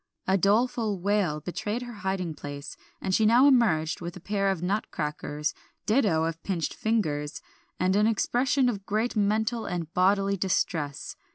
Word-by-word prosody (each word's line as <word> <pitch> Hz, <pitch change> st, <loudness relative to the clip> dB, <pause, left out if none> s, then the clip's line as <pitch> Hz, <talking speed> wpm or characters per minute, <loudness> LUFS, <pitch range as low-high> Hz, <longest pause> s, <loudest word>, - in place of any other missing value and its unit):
A 190 Hz, -, +2 dB
doleful 215 Hz, +1 st, +2 dB
wail 185 Hz, -5 st, 0 dB
betrayed 210 Hz, -, -3 dB
her 240 Hz, -1 st, -8 dB
hiding 190 Hz, -4 st, -2 dB
place, 145 Hz, -1 st, -7 dB, 0.2 s
and 190 Hz, -, -2 dB
she 220 Hz, -, +3 dB
now 235 Hz, +5 st, +6 dB
emerged 200 Hz, -, +3 dB
with 175 Hz, +2 st, -6 dB
a -, -, -9 dB
pair 195 Hz, +2 st, 0 dB
of 185 Hz, -3 st, -2 dB
nutcrackers, 150 Hz, -6 st, -2 dB, 0.3 s
ditto 210 Hz, -9 st, +2 dB
of 165 Hz, 0 st, -3 dB
pinched 175 Hz, -3 st, -2 dB
fingers, 155 Hz, -10 st, -1 dB, 0.4 s
and 185 Hz, +1 st, +2 dB
an 210 Hz, +1 st, +4 dB
expression 250 Hz, +4 st, +2 dB
of 200 Hz, -5 st, -3 dB
great 220 Hz, +4 st, 0 dB
mental 220 Hz, +3 st, 0 dB
and 170 Hz, -2 st, -4 dB
bodily 195 Hz, +2 st, +2 dB
distress. 170 Hz, -6 st, -1 dB
195 Hz, 155 wpm, -27 LUFS, 165-220 Hz, 0.4 s, now